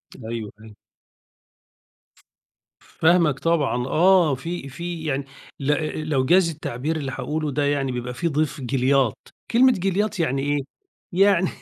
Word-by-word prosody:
أيوه، 110 -3 -9 0.3
أيوه. 110 -1 -14 1.4
ف - - -25 0.8
فاهمك 160 -4 +3
طبعًا، 145 -7 0
آه، 175 -2 +4
في 165 0 -6
في 170 +3 -6
يعني 140 -1 -1 0.3
ل 135 - -6 0.4
لو 130 -3 +1
جاز 175 +3 +4
التعبير 150 0 -4
اللي 135 -3 -4
هاقوله 155 +2 -3
ده 145 +1 0
يعني 140 -2 0
بيبقى 125 0 -4
في 170 +7 -2
ضيف 150 -2 -1
جِلياط، 130 -1 +1 0.3
كلمة 255 +2 +6
جِلياط 195 +2 -1
يعني 135 -4 0
إيه، 145 +1 0 0.5
يعني 190 -1 +4
150 Hz, 135 wpm, -23 LUFS, 135-175 Hz, 1.4 s, كلمة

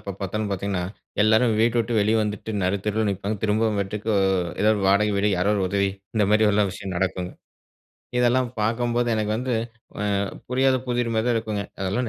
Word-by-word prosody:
எப்ப 100 - -6
பார்த்தாலும் 100 +2 -2
பார்த்தீங்கன்னா 100 -1 -2 0.4
எல்லாரும் 110 +1 +4
வீட்ட 115 +1 +2
விட்டு 115 +1 -2
வெளியே 105 +2 +2
வந்துட்டு 105 +1 -4
நருத்தெருவில 100 +3 0
நிப்பாங்க. 100 +2 -3
திரும்பவும் 110 0 +1
வீட்டுக்கு 105 +3 -3 0.5
ஏதாவது 110 +2 +4
1 100 - -2
வாடகை 105 +2 +3
வீடு 105 +1 +2
யாராவது 100 +3 +2
1 95 - 0
உதவி 100 0 +1 0.3
இந்த 105 - +4
மாதிரில்லாம் 105 -2 +3
விஷயம் 95 -2 -6
நடக்கும். 90 0 -1 0.9
இதெல்லாம் 125 +1 +3
பார்க்கும்போது 120 +2 0
எனக்கு 105 0 -1
வந்து 125 +2 -2 1.0
புரியாத 130 +1 +3
புதிர் 120 -1 0
மாதிரி 110 +2 +1
தான் 120 - +2
இருக்குங்க. 110 -2 -2 0.2
அதெல்லாம் 100 +6 -1
105 Hz, 165 wpm, -24 LUFS, 100-115 Hz, 1.0 s, எல்லாரும்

